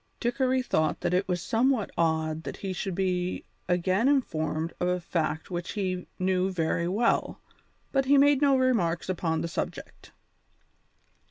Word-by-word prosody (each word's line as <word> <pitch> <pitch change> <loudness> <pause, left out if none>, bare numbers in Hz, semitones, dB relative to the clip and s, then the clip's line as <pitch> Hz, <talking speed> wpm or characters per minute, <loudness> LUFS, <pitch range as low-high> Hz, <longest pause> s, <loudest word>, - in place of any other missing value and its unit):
Dickory 255 +1 +1
thought 155 -10 0
that 175 - 0
it 185 +2 +1
was 180 -2 -1
somewhat 235 -1 +1
odd 160 -1 0
that - - -7
he 195 -2 -4
should 190 0 -3
be 180 -1 -1 0.2
again 185 +6 +2
informed 160 - 0
of 180 - 0
a 180 0 +1
fact 165 -1 -2
which 175 0 -4
he 185 -3 -2
knew 185 0 +1
very 170 -1 0
well, 215 +6 +1 0.5
but 270 -1 +2
he 280 +2 +5
made 285 0 +5
no 280 -2 +5
remarks 190 -11 +1
upon 165 -3 -1
the - - -2
subject. - - -6
185 Hz, 155 wpm, -27 LUFS, 170-240 Hz, 0.5 s, he